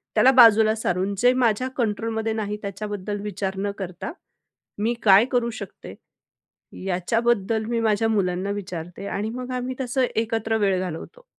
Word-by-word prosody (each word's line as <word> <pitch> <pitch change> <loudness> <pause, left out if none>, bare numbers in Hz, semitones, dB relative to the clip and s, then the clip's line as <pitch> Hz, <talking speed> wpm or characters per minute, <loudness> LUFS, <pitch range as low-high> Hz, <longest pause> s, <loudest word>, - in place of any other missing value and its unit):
त्याला 265 - +6
बाजूला 225 -3 +7
सारून 190 -2 -1
जे 245 +3 +5
माझ्या 250 0 +1
कंट्रोलमध्ये 220 -1 -1
नाही 210 -1 -3
त्याच्याबद्दल 205 0 -4
विचार 195 -1 -3
न 200 +1 -1
करता, 190 - -6 0.7
मी 225 +3 +1
काय 200 +1 +7
करू 240 -1 +1
शकते, 225 - -9 0.9
याच्याबद्दल 220 +3 0
मी 235 0 -1
माझ्या 220 0 +2
मुलांना 190 -2 0
विचारते 180 -2 -6
आणि 210 +2 -2
मग 250 +1 -6
आम्ही 250 +1 -3
तसं 255 +1 +1
एकत्र 225 0 0
वेळ 195 -3 +1
घालवतो. 185 - -7
215 Hz, 140 wpm, -24 LUFS, 195-230 Hz, 0.9 s, बाजूला